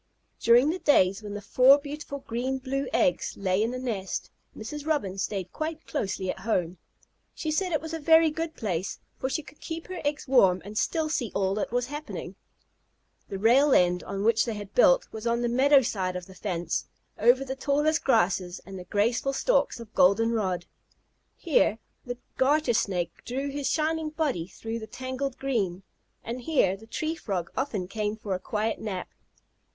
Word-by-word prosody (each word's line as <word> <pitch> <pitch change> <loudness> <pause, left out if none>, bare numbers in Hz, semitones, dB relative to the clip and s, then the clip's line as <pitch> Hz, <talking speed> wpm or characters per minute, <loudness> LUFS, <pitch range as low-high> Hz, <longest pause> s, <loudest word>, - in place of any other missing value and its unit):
During 245 +6 +5
the 365 - -4
days 195 - +4
when 205 -1 -6
the 205 - -6
four 255 +6 +6
beautiful 285 -1 -7
green 250 +3 -2
blue 270 +1 -2
eggs 180 - +1
lay 190 0 +1
in 225 - +1
the 250 - -4
nest, 220 -7 -3 0.3
Mrs. 295 +7 -6
Robin 200 -12 0
stayed 195 -2 -3
quite 315 0 -4
closely 190 -8 -2
at - - -9
home. 180 -4 -1 0.6
She 315 - -3
said 365 +4 0
it 310 - +1
was 320 +1 -6
a 325 - -2
very 320 +1 +5
good 325 +1 -4
place, 190 -5 -3 0.2
for 260 - -1
she 315 +3 -2
could 290 - -16
keep 325 0 -5
her 370 -1 -5
eggs 290 0 -2
warm 195 -9 +5
and 205 +1 -8
still 315 +8 0
see 250 -8 -1
all 190 -1 +1
that 210 +2 -2
was 245 0 +1
happening. 295 +3 -6 1.0
The 195 - -4
rail 255 +7 +5
end 180 0 +3
on 195 0 -4
which 225 0 +4
they 230 -3 -3
had 205 -1 -8
built - - +5
was 220 +1 -5
on 235 +1 +1
the - - +2
meadow 270 +3 +5
side 185 -5 -2
of 180 -1 -5
the 190 - -13
fence, 175 -4 -3 0.3
over 245 +4 +4
the 265 0 -4
tallest 295 +4 +1
grasses 190 -6 +2
and 190 -1 -8
the 180 - -9
graceful 230 +8 +1
stalks - - +1
of 230 -2 -11
golden 215 +5 +4
rod. 185 -6 -1 0.7
Here 295 - +2 0.3
the 245 0 -4 0.2
Garter 280 -1 +3
Snake 185 -6 0
drew 270 +3 -3
his 285 -1 -2
shining 315 0 0
body 300 - -1
through 225 +4 -6
the 220 - -8
tangled 260 +2 -4
green, 200 -9 -1 0.4
and 240 +2 -5
here 240 - +2
the 220 +3 -15
Tree 310 +7 -2
Frog 190 - -4
often 225 -9 -2
came 210 +1 -2
for 205 -3 -4
a 185 - -2
quiet 215 +3 -2
nap. 195 -4 -4
235 Hz, 190 wpm, -27 LUFS, 195-285 Hz, 1.0 s, four